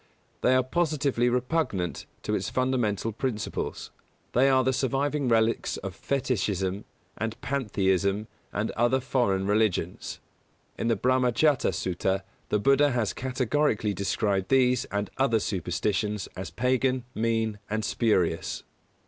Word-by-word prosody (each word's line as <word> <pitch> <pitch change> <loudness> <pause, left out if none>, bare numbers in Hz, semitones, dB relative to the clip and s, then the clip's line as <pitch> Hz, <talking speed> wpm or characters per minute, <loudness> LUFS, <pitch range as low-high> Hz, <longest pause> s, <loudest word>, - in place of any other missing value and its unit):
They 130 - +4
are 130 - +4
positively 140 -4 +1
repugnant 125 - -1 0.2
to - - -2
its - - -1
fundamental 120 -5 0
principles. 110 0 -3 0.4
They 130 +3 +4
are 130 -1 +4
the 130 +1 +2
surviving 135 +2 0
relics 115 -1 +2
of - - -6
fetishism 100 -8 -1 0.3
and 110 0 -3
pantheistic 100 -6 0 0.3
and 105 +2 -1
other 120 +3 +2
foreign 120 -7 +1
religions. 100 -4 0 0.6
In - - -2
the 115 - +3
Brāhmajāta 130 +3 +3
Sutta 95 +2 -1 0.3
the - - +2
Buddha 140 +6 +4
has 110 -6 0
categorically 130 -3 0
described 100 0 0
these 125 -1 +3
and 100 0 -3
other 130 -4 +3
superstitions 100 +3 -1
as 95 +1 -5
Pagan, 130 +1 +1
mean 110 -2 0
and 110 0 -1
spurious. 95 -9 0
115 Hz, 125 wpm, -27 LUFS, 100-130 Hz, 0.6 s, They